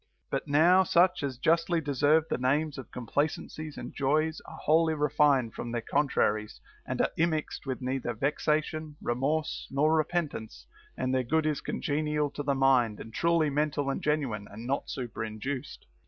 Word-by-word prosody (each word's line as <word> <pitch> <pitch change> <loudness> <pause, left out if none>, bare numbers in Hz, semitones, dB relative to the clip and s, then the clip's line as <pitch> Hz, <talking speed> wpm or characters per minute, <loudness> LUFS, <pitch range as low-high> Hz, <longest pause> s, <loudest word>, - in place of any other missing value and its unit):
But - - -2
now 170 +6 +5
such 180 0 +3
as 135 -3 -3
justly 165 +5 +2
deserve 145 +1 +3
the - - -2
names 145 +3 0
of 130 - -9
complacencies 145 +4 -3
and - - -7
joys 155 +3 0
are - - -10
wholly 160 +1 +3
refined 145 -5 +2
from 120 - -5
their 120 -1 -2
con 145 +5 +1
traries, 105 -4 0 0.3
and - - -1
are - - +1
immixed 160 -3 -1
with 130 0 -3
neither 125 -2 -2
vexation, 150 +3 -1
remorse, 140 +6 -1
nor 150 +3 +2
repentance; 155 -7 -2 0.3
and 130 0 -1
their 130 - +2
good 160 +5 +1
is 155 -2 0
congenial 150 0 -1
to - - -5
the 140 -1 0
mind 130 -5 +3
and 110 - -9
truly 165 -1 +2
mental 145 -1 0
and - - -3
genuine, 135 -9 -1
and 110 +3 -9
not 135 +3 -1
superinduced. 120 +1 -5
145 Hz, 165 wpm, -29 LUFS, 130-155 Hz, 0.3 s, now